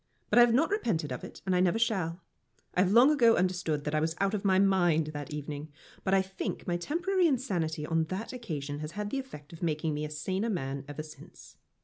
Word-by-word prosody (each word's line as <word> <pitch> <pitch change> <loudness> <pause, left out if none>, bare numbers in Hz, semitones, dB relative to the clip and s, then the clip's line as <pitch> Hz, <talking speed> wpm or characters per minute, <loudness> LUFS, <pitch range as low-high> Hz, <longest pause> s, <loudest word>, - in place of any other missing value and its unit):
But - - +6
I - - +10
have 240 -1 +6
not 315 +9 +2
repented 195 - 0
of 125 - -5
it, - - -10
and 185 -1 +1
I - - +3
never 180 +3 +3
shall. 190 -7 0 0.5
I 180 - +3
have 185 0 +2
long 245 +7 +7
ago 235 -6 +5
understood 175 -5 0
that 150 - -3
I 155 - +2
was 160 +1 -1
out 195 +1 +1
of 210 - -2
my 190 -2 +3
mind 175 -5 +3
that 145 -1 -6
evening, 150 0 -5 0.3
but 190 - 0
I 190 - +4
think 190 0 -5
my 175 - 0
temporary 345 - +1
insanity 180 - -1
on 165 0 +1
that 190 +9 -5
occasion 150 - -5
has 155 +1 -6
had 205 0 -4
the 275 - -1
effect 170 - -10
of 165 - -11
making 155 -2 -1
me 150 +1 -3
a 150 - -3
saner 185 +8 -2
man 135 -7 -3
ever 145 +1 -6
since. 155 0 -14
180 Hz, 235 wpm, -30 LUFS, 155-220 Hz, 0.5 s, I